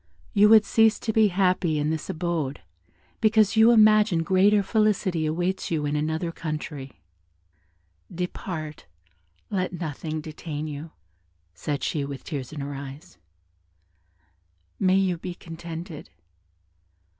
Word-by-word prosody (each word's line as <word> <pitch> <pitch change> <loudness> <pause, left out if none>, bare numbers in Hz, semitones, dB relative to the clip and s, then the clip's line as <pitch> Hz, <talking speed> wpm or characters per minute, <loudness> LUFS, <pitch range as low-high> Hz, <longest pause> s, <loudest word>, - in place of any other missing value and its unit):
You 210 +1 +6
would 215 -1 +7
cease 225 -1 +4
to 220 - -3
be 220 -1 +5
happy 180 -4 +1
in 150 +1 0
this 160 -1 -4
abode, 160 -4 -2 0.6
because 215 -1 +3
you 220 +1 +7
imagine 215 -6 +5
greater 200 +3 +4
felicity 195 -6 +1
awaits 175 +4 -1
you 155 -3 -1
in 145 +1 -1
another 160 +3 -1
country: 150 -4 -6 1.1
depart, 165 -3 -5 0.6
let 185 -2 -1
nothing 155 -2 -4
detain 155 0 -6
you," 150 +1 -6 0.6
said 140 - -4
she, 150 - -1
with 140 -1 -6
tears 135 -6 -5
in 150 -2 -6
her 140 +1 -5
eyes, 135 - -9 1.6
"may 185 0 +3
you 185 -3 +1
be 175 0 -6
contented." 165 -1 -8
165 Hz, 120 wpm, -25 LUFS, 150-195 Hz, 1.6 s, would